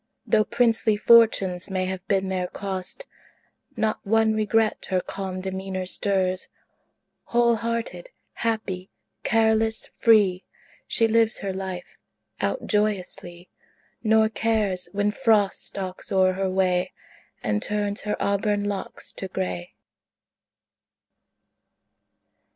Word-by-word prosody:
Though 215 -1 +3
princely 225 -3 +2
fortunes 205 -5 +4
may 185 -1 -1
have 185 -1 -4
been 195 -2 +1
their 185 -1 -1
cost, 190 - -5 0.7
Not 220 -1 0
one 220 +1 +3
regret 215 0 +1
her 185 -2 +2
calm 185 0 -5
demeanor 190 0 -4
stirs. 185 -1 0 0.8
Whole 235 -1 +3
hearted, 230 - -3 0.2
happy, 205 -5 -2 0.3
careless, 220 -1 +2
free, 205 -5 +4 0.4
She 225 - +4
lives 225 0 +3
her 195 -1 -3
life 190 -1 -6 0.4
out - - -1
joyously, 185 -4 -2 0.5
Nor 220 0 +4
cares 215 -6 0
when 205 +1 +1
Frost 215 -4 +2
stalks 190 -1 -6
o'er 185 -1 +4
her 190 0 -1
way 185 -1 +1 0.5
And 105 -1 0
turns 205 0 -2
her 210 - -2
auburn 205 +1 0
locks 205 -1 -5
to 190 - -5
gray. 90 - -4
200 Hz, 110 wpm, -25 LUFS, 185-220 Hz, 0.8 s, fortunes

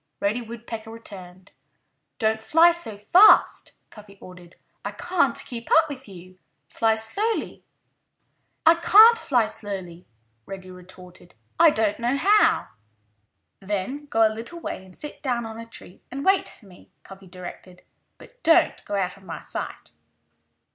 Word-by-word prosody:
Reddy 210 +5 -1
Woodpecker 230 -1 -8
returned. 190 -4 -11 0.7
"Don't 220 -1 0
fly 330 +8 +5
so 335 -12 -4
fast," 360 - +5 0.2
Cuffy 205 -2 -15
ordered. 180 -1 -14 0.3
"I - - -5
can't 335 -9 0
keep 235 -2 -8
up 320 0 +5
with 270 -4 -9
you. 185 0 -14 0.3
Fly 225 -1 +1
slowly!" 400 - -3 1.0
"I 325 - +8
can't 425 +7 +7
fly 245 - +1
slowly," 190 -5 -8 0.4
Reddy 190 -1 -9
retorted. 180 -1 -15 0.2
"I 335 0 +8
don't 220 -6 0
know 240 +3 0
how." 415 +7 +3 0.9
"Then 210 +9 -4
go 225 -5 +3
a 215 - -4
little 235 +10 -8
way - - -5
and 185 -1 -16
sit 295 - -8
down 245 -4 -2
on 225 0 -8
a 230 - -9
tree 185 -5 -13
and 275 +2 -6
wait 385 0 +2
for 215 - -16
me," 185 -2 -18
Cuffy 195 0 -14
directed. 180 0 -11 0.3
"But - - -18
don't 325 -6 +3
go 205 - -4
out 190 -1 -2
of 195 - -20
my 170 - -8
sight!" - - -7
220 Hz, 150 wpm, -24 LUFS, 190-285 Hz, 1.0 s, I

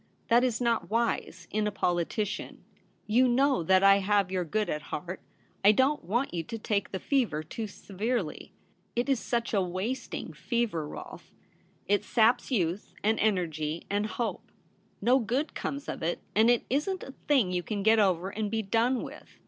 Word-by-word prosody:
That 235 +1 +5
is 245 -3 +1
not 235 -2 0
wise 230 +2 -1
— - - -26
in 210 0 0
a - - -1
politician. 195 +3 -2 0.4
You 245 +4 +4
know 265 -1 +3
that 185 +3 +4
I 195 0 +7
have 200 -1 +2
your 185 -1 0
good 210 +6 -1
at 150 - -2
heart. 175 +5 -6 0.4
I 205 - +8
don't 265 +7 +2
want 235 +9 -1
you 170 - -1
to 225 +8 -6
take 205 -2 -1
the 190 - -2
fever 230 - 0
too 220 +7 -5
severely. 205 -2 -3 0.4
It 240 +3 0
is 270 -3 +3
such 235 0 -2
a 200 - +3
wasting 185 +1 -3
fever, 170 -1 -1
Rolfe; - - -9 0.6
it 205 +1 +2
saps 225 +4 +3
youth 190 -6 -1
and 220 +1 +2
energy 165 -6 0
and 205 +1 +1
hope; 235 +1 -4 0.5
no 245 +5 +4
good 255 +7 -1
comes 280 +1 -4
of - - -5
it, 170 +2 -1
and 220 +3 +5
it 240 -1 +3
isn't 335 +8 -1
a 270 - -9
thing 260 -11 +3
you 180 -1 0
can 205 +2 -3
get 220 +1 +5
over 185 -2 +2
and 210 0 -2
be 220 +1 -1
done 230 +5 +1
with. - - -11
215 Hz, 180 wpm, -29 LUFS, 185-240 Hz, 0.6 s, I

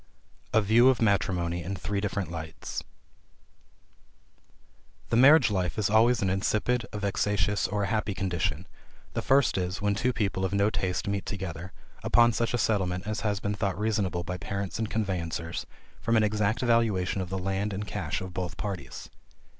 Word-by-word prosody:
A 110 - +4
VIEW 115 +5 +6
OF 130 -4 +2
MATRIMONY 90 -5 +1
IN 95 +4 -4
THREE 100 +2 -3
DIFFERENT 100 -3 -2
LIGHTS. 80 -1 -6 2.3
The - - +1
marriage 135 +1 +7
life 90 -3 -1
is 105 -2 +1
always 115 +1 +4
an 95 - +1
insipid, 110 +5 0
a - - -5
vexatious, 105 0 0
or 105 0 -1
a - - 0
happy 105 -1 -1
condition, 90 -5 -1 0.5
the - - -1
first 135 -6 +3
is, 90 +2 -2
when 105 -1 +1
two 125 +5 +1
people 100 -5 -1
of 95 +1 0
no 100 +2 +3
taste 90 -4 -2
meet 100 -1 -2
together, 90 -2 -5 0.3
upon 120 0 +5
such 115 +1 0
a - - +2
settlement 95 -5 0
as 110 0 -2
has 100 -1 -1
been 100 +1 -2
thought 100 -2 -2
reasonable 100 -5 0
by 90 +1 -4
parents 100 +1 -4
and 110 -1 -1
conveyancers, 85 -6 -3 0.3
from 115 0 +2
an 110 - +4
exact 105 +1 +1
valuation 110 -6 +2
of 90 - -5
the 95 - -2
land 95 +2 -1
and 100 +2 -4
cash 95 -8 -3
of 95 -1 -7
both 90 -1 -4
parties. 100 -4 -5
100 Hz, 175 wpm, -28 LUFS, 95-110 Hz, 2.3 s, marriage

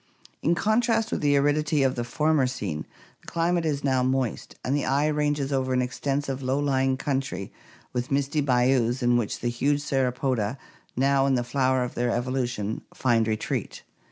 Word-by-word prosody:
In 170 +3 +2
contrast 225 +2 +1
with - - -1
the 145 -1 +3
aridity 145 +1 +2
of 130 -1 +2
the 120 - -3
former 150 +3 +1
scene 100 -12 -4 0.3
the - - -23
climate 170 0 0
is 145 -2 -1
now 130 -2 +2
moist, 130 -2 -1
and 135 - +1
the 145 - 0
eye 140 +2 +1
ranges 145 -2 0
over 130 -1 0
an 125 - +2
extensive, 135 +1 -2
low 130 +1 0
lying 135 -2 +1
country 130 -10 -3 0.4
with 125 0 -2
misty 140 +2 +1
bayous 125 -1 +2
in 120 0 +4
which 120 -4 -1
the 120 - 0
huge 140 +5 0
Sauropoda, 130 -4 0 0.4
now 135 +1 +3
in 135 - +3
the 120 - 0
flower 130 0 +1
of 125 - -4
their 120 0 0
evolution, 120 -3 -2
find 115 -3 +2
retreat. 110 -1 -3
135 Hz, 175 wpm, -26 LUFS, 125-145 Hz, 0.4 s, in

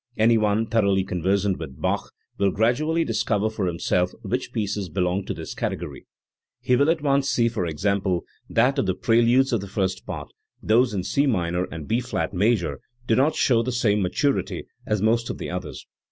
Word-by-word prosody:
Any 115 +2 +5
one 110 0 +2
thoroughly 100 -4 +2
conversant 95 +2 0
with 70 -6 -8
Bach - - -1 0.3
will 100 - +3
gradually 140 - +1
discover 110 -5 0
for 105 -4 -2
himself 90 +1 0
which - - -2
pieces 100 -3 -2
belong 90 +3 -1
to - - -3
this - - -6
category. - - -5 0.5
He 125 - +2
will 140 +4 +3
at 165 -2 +1
once 140 -1 +2
see, 115 -1 +2
for 110 -7 -2
example, 95 +2 0 0.3
that 135 +2 +2
of 105 - 0
the 95 - +1
preludes 120 +4 +3
of 115 - +1
the 100 - -7
First 95 -1 -2
Part, - - -6 0.3
those 115 0 +2
in 95 - -1
C 140 +9 +1
minor 90 -6 0
and 80 -5 -8
B 115 - +1
flat 125 -3 -3
major 100 -1 +1 0.3
do 115 - +2
not 140 +6 +3
show 120 -3 +3
the 125 +2 -2
same 105 -4 +1
maturity 135 +10 0 0.2
as 105 -2 0
most 115 +2 +2
of - - -4
the - - -5
others. 90 -3 -6
105 Hz, 190 wpm, -24 LUFS, 95-120 Hz, 0.5 s, Any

